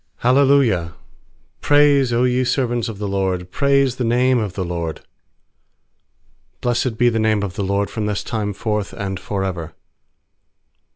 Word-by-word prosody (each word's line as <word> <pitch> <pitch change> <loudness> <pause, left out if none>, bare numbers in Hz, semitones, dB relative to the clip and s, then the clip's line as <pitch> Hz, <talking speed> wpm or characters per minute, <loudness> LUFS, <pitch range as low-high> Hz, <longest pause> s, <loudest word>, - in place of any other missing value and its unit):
j. 120 - +3
_L 140 +1 +5 0.3
ci - - -17 0.7
praise^ 145 -2 +4
Q 120 +1 +1
ye 125 0 +1
servants 120 -2 -1
of 110 - -7
the 105 0 -4
LORD, 95 -2 -2
Praise 140 -1 +2
the 125 - -1
name 125 +2 +2
of 105 -5 -3
the 95 0 -3
LORD. 85 -2 -4 1.6
^Blessed 120 -1 0
be 120 - +3
the 115 -1 -1
name 110 -2 +1
of 95 -3 -4
the 100 +1 -3
LORD 100 +1 -1
From 110 -2 -3
this 105 -1 -2
time 105 -3 -3
forth 105 0 -3
and 95 -3 -4
for 95 +1 -3
ever. 85 -4 -5
110 Hz, 165 wpm, -20 LUFS, 100-125 Hz, 1.6 s, L